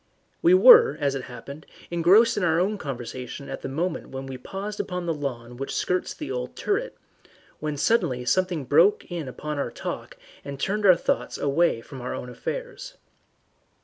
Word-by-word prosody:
We 345 +2 +6
were, 470 +3 +8
as 140 -2 +1
it 135 -2 -4
happened, 140 +5 -10 0.2
engrossed 180 +7 +5
in 205 - -1
our 165 -1 +3
own 200 +3 0
conversation 130 0 -6
at - - -6
the - - -5
moment 165 +5 -2
and 135 0 -5
we 135 - -6
had 130 0 -10
paused 205 +2 -6
upon 180 -2 -3
the 165 - 0
lawn 125 -5 -5
which 135 +1 -4
skirts 180 0 -1
the - - -6
old 125 -1 -4
turret, 485 +5 -2 0.6
when 150 -1 -3
suddenly 145 - +1
something 180 -1 0
broke 420 - +4
in 165 -5 -4
upon 150 +3 -5
our - - -1
talk - - -6 0.3
and 140 -1 -7
turned 205 +5 0
our 185 - +8
thoughts - - -2
away 145 -3 +1
from 130 +2 -10
our 125 - -4
own 125 - -6
affairs. - - -6
160 Hz, 180 wpm, -25 LUFS, 135-200 Hz, 0.6 s, were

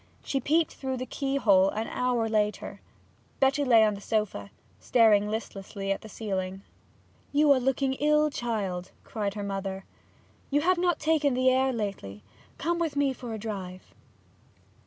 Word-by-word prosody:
She 275 - -1
peeped 315 +5 +1
through 265 -1 -4
the 255 - -4
keyhole 230 -10 +2
an 220 +2 -3
hour 245 -2 0
later. 210 -1 -1 0.6
Betty 275 +2 +3
lay 235 -5 +6
on 215 -1 +3
the 200 - -8
sofa, 205 - -2 0.3
staring 210 - +4
listlessly 195 -2 -4
at 195 - -1
the 220 - -11
ceiling. 190 -2 -4 0.7
'You 295 0 +4
are 270 - +5
looking 265 +1 0
ill, 300 +2 +2
child,' 195 -8 -3
cried 205 -2 -3
her 205 - -4
mother. 195 -1 -4 0.6
'You've 330 +6 +2
not 350 -3 +2
taken 300 -4 +1
the 255 0 +4
air 260 +1 +2
lately. 195 - -5 0.3
Come 340 +3 -1
with 325 -4 -1
me 285 -2 +2
for 245 -2 -8
a - - -5
drive.' 195 -4 -7
230 Hz, 155 wpm, -27 LUFS, 200-275 Hz, 0.7 s, lay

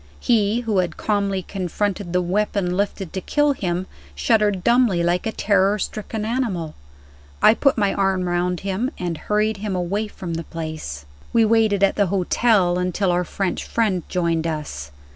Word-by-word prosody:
He 225 -1 +2
who 220 -5 0
had 175 -3 -1
calmly 200 -3 0
confronted 195 0 -3
the 180 0 +1
weapon 185 -1 0
lifted 195 -2 -2
to 190 - -3
kill 295 +8 +2
him, 180 -6 -2 0.3
shuddered 205 - +2
dumbly 235 -7 +3
like 175 +4 +1
a - - -1
terror 200 -1 +2
stricken 215 +1 -4
animal. 215 -10 -2 0.7
I - - +7
put 275 +3 +2
my 200 -2 +2
arm 190 -2 +1
round 175 0 0
him, 200 +6 -1
and 175 -2 -3
hurried 210 +5 0
him 200 -1 -3
away 195 +5 -1
from 180 -4 -7
the 165 0 -3
place. 155 - -6 0.3
We 230 -1 +5
waited 215 -3 +3
at 195 - +3
the 200 -2 +3
hotel 185 0 +2
until 180 +1 0
our 175 +1 +1
French 190 +1 -2
friend 210 -6 0
joined 170 -2 0
us. 150 - -5
195 Hz, 165 wpm, -22 LUFS, 175-210 Hz, 0.7 s, I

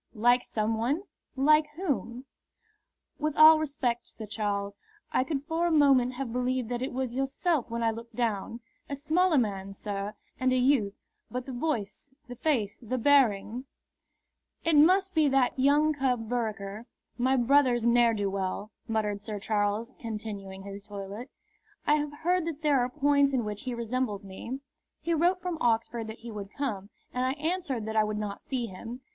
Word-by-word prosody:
"Like 245 +3 +4
some 220 +1 -1
one? 280 - 0 0.3
Like 300 +3 +4
whom?" 265 -8 -3 0.9
"With 305 -1 -1
all 310 0 +9
respect, 270 -6 -2
Sir 220 - -8
Charles, 200 -1 -3 0.3
I - - +2
could 280 -1 -3
for 325 +3 0
a - - +1
moment 270 -5 +4
have 250 -2 -4
believed 250 -1 -1
that 245 0 -2
it 260 - -2
was 255 -1 -3
yourself 270 +2 0
when 230 0 -2
I 225 - +3
looked 230 +1 -9
down. 230 -1 -2 0.3
A 280 - -2
smaller 320 +4 +2
man, 195 -5 -1
sir, 205 +1 -4 0.2
and 255 0 +2
a 255 - +3
youth; 250 -6 +2 0.3
but 250 0 -4
the 265 - -6
voice, 245 -2 -3 0.2
the 245 - -7
face, 230 -8 0
the 245 +2 -2
bearing 245 -3 +3 0.5
" - - -43
"It 330 -1 +3
must 375 +6 +5
be 315 -2 +4
that 265 -1 +2
young 295 +3 +4
cub 250 -5 0
Vereker, 220 -2 -3 0.3
my 260 +2 +3
brother's 250 -1 +3
ne'er 235 -1 +4
do 205 -1 0
weel," 195 +2 -3 0.2
muttered 210 -3 -1
Sir 210 0 -5
Charles, 210 +3 -1
continuing 205 -4 -6
his 200 0 -8
toilet. 205 +4 -7 0.6
"I 300 - +4
have 295 0 -4
heard 355 0 +2
that 315 -2 -5
there 290 -3 +4
are 245 0 +1
points 280 0 +3
in 245 -4 +1
which 210 +1 -5
he 250 -2 -2
resembles 235 -3 -2
me. 230 +8 -6 0.4
He 335 - -1
wrote 350 +3 +2
from 355 -3 -3
Oxford 230 -1 +1
that 220 +1 -9
he 235 0 -7
would 205 -2 -7
come, 210 -9 -3 0.2
and 250 - 0
I 260 +1 +1
answered 300 -6 -2
that 220 0 -4
I 215 - +5
would 215 0 -2
not 210 -1 -4
see 255 -3 -2
him. 230 +5 -8
245 Hz, 180 wpm, -29 LUFS, 215-285 Hz, 0.9 s, all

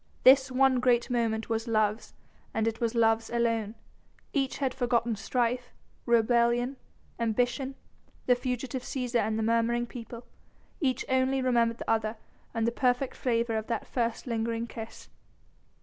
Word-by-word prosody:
This 265 0 +7
one 260 0 +4
great 245 0 +2
moment 225 -2 0
was 225 +1 -2
love's, 215 -1 0 0.4
and 225 0 +1
it 225 +1 -2
was 230 0 0
love's 225 -1 +3
alone. 230 -2 0 0.6
Each 270 -2 0
had 265 -3 -1
forgotten 240 -3 +1
strife, 245 +3 -1 0.4
rebellion, 235 +2 +3 0.4
ambition, 245 +4 0 0.5
the 250 - +5
fugitive 250 +1 -3
Cæsar 250 -2 -1
and 215 0 0
the 220 - 0
murmuring 230 +1 +1
people. 235 -1 -9 0.5
Each 265 -7 0
only 260 +1 +2
remembered 235 -3 +2
the - - -8
other 220 0 0 0.3
and 225 -1 -1
the 235 - +2
perfect 250 +2 0
flavour 235 -2 0
of 220 - -4
that 230 -2 -2
first 235 -2 -2
lingering 230 -1 -1
kiss. 225 -1 -9
235 Hz, 145 wpm, -29 LUFS, 225-250 Hz, 0.6 s, This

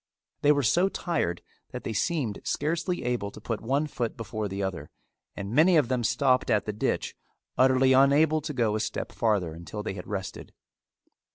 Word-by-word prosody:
They 145 - +5
were 145 -1 +2
so 175 - +3
tired 160 - -2 0.3
that - - -7
they 110 - -3
seemed 125 - -1
scarcely 165 +4 -1
able 120 -5 -1
to - - -12
put 115 -2 -4
one 140 +6 0
foot 120 -6 -4
before 110 -1 -4
the 100 0 -4
other 95 -3 -4 0.5
and 100 +1 -5
many 165 +5 +5
of 145 -6 +2
them 125 -2 0
stopped 130 +2 +2
at 105 -3 +2
the 105 - -3
ditch 105 - -2 0.4
utterly 130 0 +4
unable 145 +4 +4
to 150 - -4
go 115 -5 +1
a - - 0
step 110 - -3
farther 100 -8 0
until 85 +6 -7
they 105 - -3
had 90 -2 -8
rested. 95 -2 -6
120 Hz, 185 wpm, -27 LUFS, 105-145 Hz, 0.5 s, They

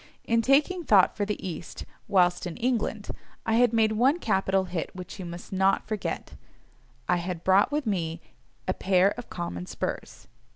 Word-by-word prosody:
In 230 0 +2
taking 295 +9 +2
thought 200 - +5
for 205 - -1
the 210 - -2
East, 170 -1 -7 0.2
whilst 180 -2 +2
in 175 - -7
England, 230 -4 -1 0.4
I 225 - +1
had 245 -1 +4
made 220 -1 +3
one 255 +8 +3
capital 195 - +1
hit 175 -3 -4
which 185 +2 -8
you 185 - -5
must 170 +2 -8
not 190 +1 +2
forget—I 180 - -5
had 175 -1 -4
brought 190 +7 +4
with 295 -1 -1
me 170 -6 -2 0.5
a - - +1
pair 190 0 +3
of 245 +2 -8
common 90 - -5
spurs. - - -5
195 Hz, 165 wpm, -27 LUFS, 180-230 Hz, 0.5 s, thought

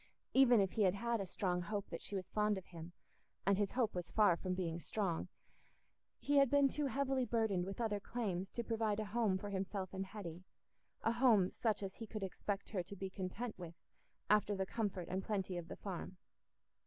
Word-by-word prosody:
Even 250 -3 +7
if 195 -2 +2
he 220 - -1
had 190 -1 +4
had 235 +1 0
a 195 - -4
strong 180 -1 0
hope 205 +2 -3
that 165 - -4
she 200 - -6
was 185 -2 -3
fond 210 -1 +2
of 190 - -7
him—and 175 +3 -4
his 205 -2 +1
hope 245 -4 +1
was 175 -1 -4
far 210 -5 +5
from 185 +1 -2
being 170 -3 -2
strong—he 195 - -4
had 275 -2 +6
been 285 0 +5
too 290 +1 -1
heavily 270 0 +1
burdened 220 -7 +1
with 195 - -5
other 215 -3 0
claims 195 -5 -2
to 235 - -3
provide 220 -2 0
a 215 - -1
home 210 -2 +1
for 205 +2 -5
himself 190 -1 -3
and 190 0 -3
Hetty—a 185 +3 -6
home 230 -6 +5
such 220 -3 0
as 190 -1 -4
he 225 - -8
could 215 -1 -5
expect 195 +1 -3
her 195 -4 0
to 180 +3 -9
be 190 0 -5
content 200 +4 -4
with 170 -2 -7 0.5
after 210 -1 +4
the 190 0 0
comfort 195 -4 -2
and 190 +1 -2
plenty 190 -3 -1
of 175 -1 -4
the - - -6
Farm. 185 -1 -5
200 Hz, 200 wpm, -38 LUFS, 185-225 Hz, 0.5 s, Even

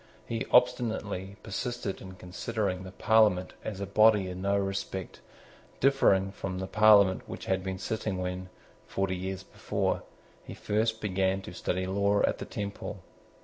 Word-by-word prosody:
He 115 -1 -3
obstinately 110 -6 +2
persisted 120 -1 -4
in 95 -1 -9
considering 95 +1 -3
the 95 0 -8
Parliament 105 -3 +3
as 100 -3 -5
a 100 - -2
body 105 0 +5
in 90 0 -6
no 100 +1 +2
respect 95 -1 -3 0.6
differing 100 -8 +4
from 95 -1 -5
the 95 - -3
Parliament 105 -2 +5
which - - -7
had 95 0 0
been 95 0 -3
sitting 110 -1 -3
when, 90 0 -4 0.4
forty 95 -1 -1
years 95 +1 -4
before, - - -2 0.4
he - - -9
first 110 +1 0
began 95 -1 0
to - - -8
study 95 +1 -2
law 100 +2 +2
at - - +1
the - - -5
Temple. 100 -2 -5
95 Hz, 150 wpm, -29 LUFS, 95-110 Hz, 0.6 s, body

